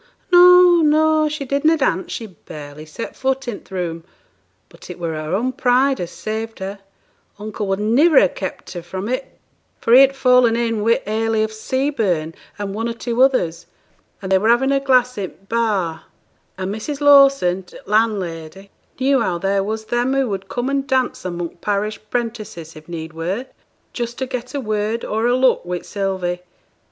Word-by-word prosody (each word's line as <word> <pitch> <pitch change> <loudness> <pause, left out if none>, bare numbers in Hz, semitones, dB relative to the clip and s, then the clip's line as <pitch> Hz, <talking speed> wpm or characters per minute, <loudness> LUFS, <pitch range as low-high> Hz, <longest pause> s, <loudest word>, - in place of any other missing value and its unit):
"' - - -40
'No, 355 -1 +8
no, 310 0 +3
she 295 -2 -4
did 280 +2 -1
na' 320 +1 +5
dance; 190 - -1
she 230 - -5
barely 150 -5 -11
set 155 +9 -7
foot 265 0 -1
i' 230 -4 -3
th' - - -20
room; 170 -3 -4 0.6
but - - -16
it 180 - -7
were 170 -2 -3
her 155 +3 -3
own 245 +6 0
pride 260 +1 +2
as 175 - -4
saved 220 +1 -5
her; 195 +1 -6 0.6
uncle 210 0 -5
would 195 0 -1
niver 265 +9 +5
ha' 180 - -3
kept 190 - -6
her 175 - -5
from 185 +4 -6
it, 255 +3 -4 0.4
for 230 - +1
he 255 - +9
had 275 0 +4
fallen 250 -3 +4
in 230 -2 -1
wi' 230 +2 +2
Hayley 220 +1 0
o' - - 0
Seaburn 220 - -1 0.2
and 200 -1 -4
one 225 +3 -2
or 230 - -4
two 240 +1 -2
others, 180 -12 +2 0.6
and 190 - -4
they 190 - +5
were 215 +4 +1
having 255 +3 +3
a 275 - +3
glass 250 -3 +2
i' 195 - -2
t' - - -16 0.2
bar, 200 -8 -1 0.5
and 190 +1 -3
Mrs. 275 +7 -5
Lawson, 275 -10 +5
t' 180 - -15
landlady, 195 -4 -1 0.3
knew 265 -1 +2
how 185 -6 0
there 195 +2 0
was 220 +2 -4
them 240 +4 0
who 270 -1 +1
would 195 -1 -5
come 245 +1 -2
and 275 0 -1
dance 260 -2 0
among 175 -1 -5
parish 210 +3 -2
'prentices 215 -9 -4
if 155 +2 -14
need 160 -1 -6
were, 180 +10 -3 0.5
just 240 -1 -4
to 260 - -2
get 250 +1 -6
a - - -1
word 215 -1 -2
or 220 +2 0
a 245 - +3
look 255 0 +3
wi' 180 0 -3
Sylvie! 185 -3 -3
220 Hz, 190 wpm, -20 LUFS, 190-260 Hz, 0.6 s, he